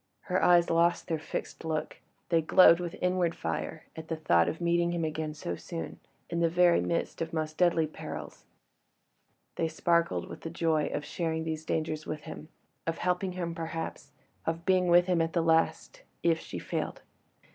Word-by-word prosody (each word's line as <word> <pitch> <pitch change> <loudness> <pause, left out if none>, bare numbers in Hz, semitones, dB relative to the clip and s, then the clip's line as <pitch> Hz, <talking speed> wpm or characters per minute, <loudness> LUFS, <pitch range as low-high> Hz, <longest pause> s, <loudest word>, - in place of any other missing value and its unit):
Her 185 -1 0
eyes 175 -1 +5
lost 170 +1 +3
their 160 -2 -1
fixed 160 - -5
look; 160 -1 -3 0.3
they 165 -2 +4
glowed 170 +1 +7
with 175 -2 -4
inward 180 -2 +1
fire 80 -1 -4
at 160 0 -8
the 160 - -2
thought 85 - +3
of 160 - -5
meeting 170 0 +1
him 170 -2 -1
again 155 0 -3
so 170 +3 -4
soon, 165 -2 -6 0.3
in 170 - -2
the 170 -1 +3
very 175 0 +4
midst 170 - -2
of 165 +1 -3
most 155 -1 -2
deadly 170 -2 +3
perils; 155 - -8 1.1
they 165 - +1
sparkled 160 - +1
with - - -9
the 165 - -5
joy 160 -2 +1
of 150 - -3
sharing 160 -1 -2
these 160 -1 -4
dangers 155 -1 -2
with 155 0 -4
him—of 160 +1 -8
helping 180 +1 0
him 175 -2 -3
perhaps—of 165 0 -6
being 185 -1 +3
with 175 0 +6
him 180 -2 +2
at 165 0 -1
the 170 - +2
last—if 165 - 0
she - - -7
failed. - - -4
165 Hz, 170 wpm, -29 LUFS, 160-175 Hz, 1.1 s, glowed